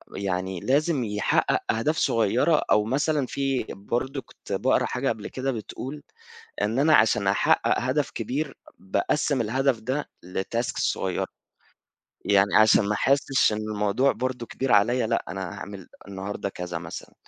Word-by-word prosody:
يعني 95 -1 -2
لازم 145 - +1
يحقَّق 105 -2 +1
أهداف 130 +9 0
صغيّرة، 120 +8 +2
أو 105 0 +4
مثلًا 145 +4 +1
في 135 0 -1
برضه 125 +7 -3
كنت 120 - -15
باقرا 125 +7 +2
حاجة 135 +2 -1
قبل 105 - -3
كده 135 +1 -2
بتقول 130 +5 -6 0.6
إن 110 +5 0
أنا 155 +2 +5
عشان 110 -2 +3
أحقَّق 100 - +3
هدف 130 +4 0
كبير، 135 +6 -3 0.2
باقسِّم 130 +9 0
الهدف 130 +2 +1
ده 130 +6 -3 0.2
لtasks 105 +6 -3
صغيّرة، - - -1 1.0
يعني 100 0 +3
عشان 110 -1 +6
ما 105 - +1
أحسِّش 135 +1 +2
إن - - -2 0.2
الموضوع 105 +6 +2
برضه 125 -1 -3
كبير 130 +2 -3
عليَّ 115 +3 +3
لأ، 115 0 0
أنا 95 +2 -4 0.2
هاعمل 100 -3 -8 0.2
النهارده 100 +1 -4
كذا 90 -2 -5
مثلًا، 80 0 -8
115 Hz, 140 wpm, -25 LUFS, 100-135 Hz, 1.0 s, عشان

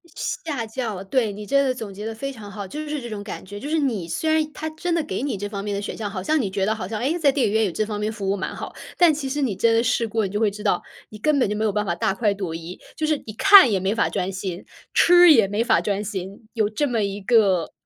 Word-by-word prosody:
吓 290 - -3
叫 220 -4 -4
对， 215 +1 0
你 210 +1 -8
真 275 +6 +3
的 260 - +1
总 220 -5 -7
结 205 +2 -7
得 225 - -3
非 275 +5 -4
常 220 -6 -10
好， 200 0 -6
就 300 +10 -6
是 300 -1 -3
这 240 - -7
种 210 -2 -6
感 205 - -7
觉， 205 +2 -8
就 280 - -6
是 320 - +1
你 230 - -1
虽 315 - -1
然 315 0 +4
它 315 - -4
真 340 +2 -3
的 330 - +1
给 300 - -4
你 275 -6 -2
这 205 +1 -4
方 200 -1 -5
面 205 -1 -2
的 200 - -2
选 205 - -5
项， 215 -2 -3
好 190 -2 -5
像 310 +8 +2
你 205 - -2
觉 190 0 -1
得 215 - +1
好 215 -4 -5
像， 215 +1 -4
哎， 280 +9 0
在 290 -4 +4
电 270 -1 +1
影 205 - -2
院 220 0 +3
有 190 - -1
这 215 - -1
方 210 -1 -4
面 210 +1 -1
服 205 -3 -4
务 195 - +2
蛮 190 - -4
好， - - -7 0.2
但 345 -3 +6
其 285 -2 -4
实 290 +2 -2
你 240 -8 0
真 230 +4 +3
的 225 +1 +3
试 235 -1 +1
过， 220 -1 0
你 190 - -4
就 205 - -1
会 220 -1 +3
知 210 +1 -9
道， 200 -4 +1 0.3
你 215 - -10
根 300 +7 +1
本 245 - +2
就 210 - -1
没 215 +1 -1
有 215 - +2
办 210 +1 -1
法 175 - 0
大 190 - 0
快 205 0 +1
朵 190 -5 -4
颐， 165 +2 -8 0.2
就 315 - -1
是 310 -1 +1
你 215 - -7
看 395 - +8
也 200 -3 +1
没 190 +2 0
法 230 - +1
专 190 -1 -2
心， 185 -2 -5 0.3
吃 350 -1 +7
也 225 -7 +5
没 205 +3 0
法 230 -2 +3
专 205 0 -1
心。 200 +1 -6
有 215 -3 +1
这 285 +7 -1
么 235 -4 0
一 200 0 -3
个 195 -6 +2
215 Hz, 335 characters per minute, -23 LUFS, 200-265 Hz, 0.3 s, 看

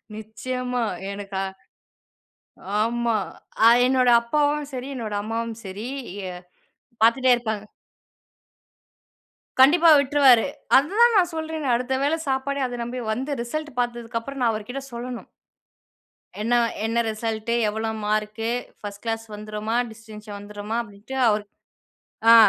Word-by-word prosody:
நிச்சயமா 250 +3 -3 0.3
எனக்கா 195 -1 -4 1.4
ஆமா. 235 0 +1 0.5
அ - - +9 0.2
என்னோட 255 -1 +3
அப்பாவும் 295 +4 +1
சரி, 255 +1 -5
என்னோட 220 -3 -4
அம்மாவும் 225 +1 -3
சரி. 200 +5 -6 0.4
அ - - -7 0.7
பார்த்துன்னே 250 +2 +5
இருப்பாங்க. 220 -3 -3 2.0
கண்டிப்பா 325 +5 +7
விட்ருவாரு. 275 -4 +5 0.3
அது 275 +3 +4
தான் 475 -1 +7
நான் 355 -3 +3
சொல்றேனே 315 -3 -3
அடுத்த 250 +2 -1
வேளை 290 +3 +2
சாப்பாடே 275 +1 -1
அதை 245 -1 -5
நம்பி 245 +2 -4
வந்து 265 +6 -3
ரிசல்ட்டு 300 +2 -5
பார்த்ததுக்கு 240 -1 -2
அப்புறம் 275 +3 -7
நான் 230 - +3
அவர்கிட்ட 220 +5 -5
சொல்லணும். 240 0 -6 1.1
என்ன 230 +3 +1 0.3
என்ன 230 +1 +1
ரிசல்ட்டு? 220 +1 -2
எவ்வளவு 220 +1 -2
மார்க்கு? 215 +1 -1 0.3
ஃபர்ஸ்ட் 205 -1 -8
கிளாஸ் 225 0 -2
வந்துடுமா? 215 +2 -3
டிஸ்டென்ஷன் 215 -2 -10
வந்துடுமா? 205 +2 -5
அப்டின்ட்டு 205 +5 -9
அவரு 210 -1 +1 0.9
ஆ - - +10
235 Hz, 115 wpm, -24 LUFS, 215-265 Hz, 2.0 s, ஆ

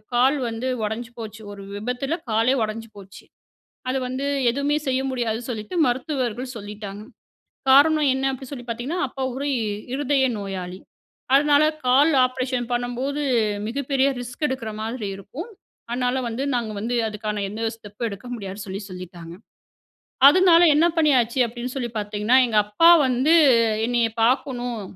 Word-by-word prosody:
கால் 265 +4 +4
வந்து 230 +3 -4 0.2
உடஞ்சு 225 +3 -4
போச்சு 220 0 -8
ஒரு 200 - -10
விபத்தில 250 +8 -3 0.2
காலே 225 +4 +2
உடைஞ்சு 225 +1 -5
போச்சு. 195 0 -13 0.7
அது 265 +1 0
வந்து 265 +2 -3 0.3
எதுமே 285 +2 0
செய்ய 260 0 +1
முடியாது 235 -3 -2
சொல்லிட்டு 220 +7 -6
மருத்துவர்கள் 250 -1 -2
சொல்லிட்டாங்க. 205 -1 -8 0.7
காரணம் 295 +1 +5
என்ன 265 0 -2
அப்டின்னு 265 -1 -8
சொல்லி 245 -3 -7
பார்த்தீங்கன்னா 250 +10 -3
அப்பா 265 +1 -7
ஒரு 280 +2 -4 0.5
இருதய 275 -1 +1
நோயாளி. 185 -2 -6 0.6
அதனால 290 +1 +5 0.2
கால் 280 +6 +5
ஆப்ரேஷன் 255 -1 -2
பண்ணும்போது 245 +4 -2 0.5
மிகப்பெரிய 275 +1 0
ரிஸ்க் 245 +5 -6
எடுக்கிற 250 -4 -4
மாதிரி 225 -1 -4
இருக்கும். 300 - -8 0.4
அதனால 250 +1 0
வந்து 235 +4 -4
நாங்க 235 -3 -1
வந்து 240 +3 -2
அதுக்கான 210 -1 -4
எந்த 220 +2 -6
ஸ்டெப் 210 +1 -8
எடுக்க 200 +4 -9
முடியாதுனு 200 -2 -7
சொல்லி 195 +2 -5
சொல்லிட்டாங்க. 175 -2 -9 1.0
அதனால 350 0 +5
என்ன 320 +3 +4
பண்ணியாச்சு 260 -6 +3
அப்டின்னு 240 +2 -6
சொல்லி 245 -3 -3
பார்த்தீங்கன்னா, 210 +4 +1
எங்க 220 - 0
அப்பா 210 +12 +5 0.2
வந்து 260 +6 +2 0.5
என்னைய 235 -1 +1
பார்க்கணும், 245 -2 0
245 Hz, 135 wpm, -23 LUFS, 215-270 Hz, 1.0 s, காரணம்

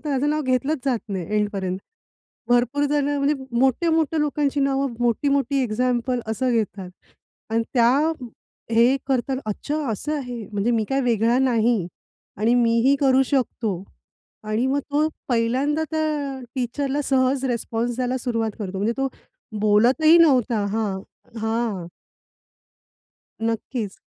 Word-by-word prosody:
तर - - -3
त्याचं 280 +2 +1
नाव 305 0 0
घेतलंच 265 +4 0
जात 255 -4 +1
नाही 190 -4 -3
एंडपर्यंत. 195 -3 -1 0.7
भरपूर 245 +4 +2
जणं 290 -1 +1
म्हणजे 280 +1 +2 0.3
मोठे, 265 +6 +2
मोठ्या 320 -1 +1
लोकांची 290 -1 0
नावं, 275 -1 0
मोठी-मोठी 275 +3 +1
एक्झाम्पल 245 +2 0
असं 245 +3 0
घेतात. 205 -5 -2 0.6
आणि 225 +1 +1
त्या 235 -2 +5 0.8
हे 235 +4 +4
करतात. 265 0 0
अच्छा 285 +8 -3
असं 300 +9 -3
आहे, 245 -5 -6
म्हणजे 205 +3 0
मी 225 -2 +1
काय 270 0 +1
वेगळा 235 0 +2
नाही 235 -7 +2 0.5
आणि 220 +3 +2
मी 230 -1 +3
ही 275 +1 +5
करू 270 -1 +4
शकतो 230 -8 -1 0.6
आणि 215 +4 0
मग 280 +2 +1
तो 300 +2 +2 0.2
पहिल्यांदा 255 +6 +1
त्या 300 -4 -1 0.2
टीचरला 270 +3 -1
सहज 265 0 +1
रिस्पॉन्स 235 -1 -2
द्यायला 255 0 -1
सुरुवात 230 -3 -1
करतो. 195 -2 -4
म्हणजे 210 +4 0
तो 270 0 +1 0.5
बोलतही 245 +10 +5
नव्हता 250 -10 +3
हां, 205 -2 -1 0.4
हां. 220 -5 -1 1.5
नक्कीच. 225 -1 -3
250 Hz, 130 wpm, -23 LUFS, 225-275 Hz, 1.5 s, त्या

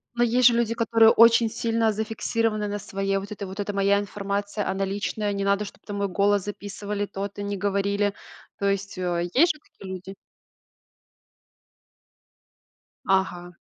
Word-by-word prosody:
Но, 240 - +2
есть 240 +1 +5
же 240 - +5
люди, 235 -1 +1
которые 230 -1 +5
очень 230 0 +6
сильно 225 0 0
зафиксированы 220 0 -1
на 205 0 -3
своей 195 0 -2
вот 195 +2 -6
это: 205 -1 -5
"Вот 190 +2 -9
эта 205 0 -2
моя 200 0 +3
информация, 200 0 -3
она 195 +1 -1
личная, 205 +1 -2
не 200 0 -2
надо, 200 +1 +1
чтоб - - -12
там 205 -1 -5
мой 200 0 0
голос 200 +1 +2
записывали, 205 0 -4
то-то 200 0 -5
не 200 0 -3
говорили". 200 +1 0 0.5
То 200 - +1
есть, 200 0 -2
э, 175 -1 -1
есть 335 +6 +5
же 300 - -18
такие 190 -9 -10
люди? 190 +1 -8 2.9
Ага. 180 -2 0
205 Hz, 155 wpm, -25 LUFS, 195-220 Hz, 2.9 s, очень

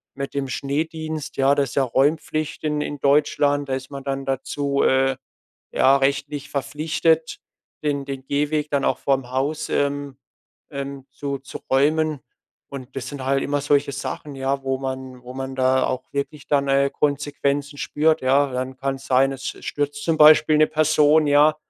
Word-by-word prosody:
mit 140 0 -5
dem 140 -1 -1
Schneedienst, 155 +3 -3
ja. 135 +1 +4
Das 140 -2 +1
ist - - -9
ja 140 - +3
Räumpflicht 150 +4 0
in 150 -1 0
in 145 -1 -4
Deutschland. 145 0 +2
Da - - 0
ist 130 +1 -7
man 140 -1 -7
dann 135 0 -3
dazu, 140 +1 -1
äh, 135 0 +3 0.6
ja, 135 +1 +5
rechtlich 140 +1 -1
verpflichtet, 160 +3 0 0.5
den 140 -2 0
den 135 -1 -6
Gehweg 150 +2 0
dann 140 -1 +1
auch - - +1
vorm 135 -3 0
Haus, 140 +4 -1
ähm, 140 -1 -1 0.5
ähm, 140 -2 -6
zu 140 +1 -4
zu 135 - -9
räumen. 150 +2 +2 0.5
Und 135 -1 -9
das 130 -1 -4
sind 140 -2 -6
halt 135 +1 +1
immer 145 0 0
solche 145 0 +1
Sachen, 140 +1 -5
ja, 135 +1 -1
wo 135 0 -1
man 130 -1 -6
wo 125 +1 -10
man 135 0 -5
da 130 0 +3
auch 130 - -4
wirklich 140 +1 -4
dann, 140 -1 +2
äh, 140 0 +3
Konsequenzen 145 0 -1
spürt, 155 +1 +1
ja. 135 +2 +3
Dann 130 +1 -3
kann's 135 0 -3
sein, 135 +1 +3
es 135 -1 -8 0.2
stürzt 145 0 -3
zum 165 -1 +1
Beispiel 155 0 +7
'ne 155 - +6
Person, 155 0 +4
ja, 145 +1 +5
140 Hz, 170 wpm, -22 LUFS, 135-145 Hz, 0.6 s, Beispiel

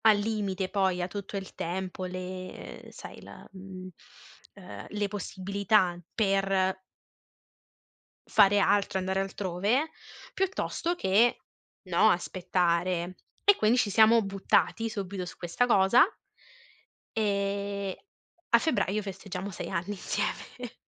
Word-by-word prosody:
Al 215 -2 +7
limite 200 -3 -2
poi 190 -3 +1
ha - - -1
tutto 200 +1 -6
il 195 -1 -7
tempo, 185 +2 -4
le 185 0 -7
ehm - - -11
sai, - - -11
la - - -12
mhmm, 190 -1 -9 0.7
ehm, 185 -3 -10
le 210 -1 -1
possibilità 200 -1 0 0.2
per 195 -2 +2 1.5
fare 200 +1 +5
altro, 200 -1 +2
andare 190 +1 -1
altrove, 195 - 0 0.4
piuttosto 370 -2 -1
che, 215 - +3 0.5
no, 185 +4 +4
aspettare. 180 -1 0 0.3
E 405 - +6
quindi 220 - +3
ci 230 - +2
siamo 220 +3 +6
buttati 195 +3 +1
subito 195 -3 -4
su 180 - -9
questa 175 +8 0
cosa 230 +1 +6 1.1
e 200 -2 -1 0.5
a 235 - +8
febbraio 215 - 0
festeggiamo 195 -1 -6
6 - - -6
anni 180 +2 -2
insieme 235 +4 -4
195 Hz, 115 wpm, -29 LUFS, 185-210 Hz, 1.5 s, a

